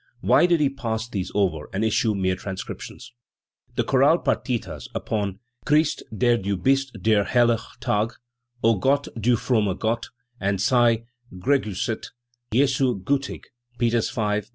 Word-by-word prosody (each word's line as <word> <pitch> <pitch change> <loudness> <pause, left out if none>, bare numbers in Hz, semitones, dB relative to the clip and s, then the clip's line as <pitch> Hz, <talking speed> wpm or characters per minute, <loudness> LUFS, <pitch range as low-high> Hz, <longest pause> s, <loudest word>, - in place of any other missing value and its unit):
Why 175 - +5
did 170 -2 +3
he 145 - +3
pass 115 -4 -3
these 95 -5 -4
over 90 -7 0
and 100 +4 -1
issue 110 0 +1
mere 95 -1 +1
transcriptions? 95 +5 -7 0.6
The - - +1
chorale 140 +5 +4
partitas 125 -8 -2
upon 100 -3 -2 0.3
"Christ, 150 +1 +2
der 120 +2 +2
du 100 -2 -2
bist 135 +8 +1
der 105 +1 +3
helle 120 0 +3 0.2
Tag", 105 +2 0 0.5
"0 115 -3 +4
Gott, 140 +6 +1
du 120 +2 +2
frommer 110 -5 0
Gott", 115 +1 -1 0.3
and 100 +1 0
u - - -3
Sei 115 +2 +3 0.3
gegriisset, 110 0 -1 0.4
Jesu 130 -2 +2
giitig" 140 +2 -1 0.3
(Peters 120 -1 +1
V, 105 -2 0
p. 105 - -22
115 Hz, 145 wpm, -24 LUFS, 100-130 Hz, 0.6 s, Why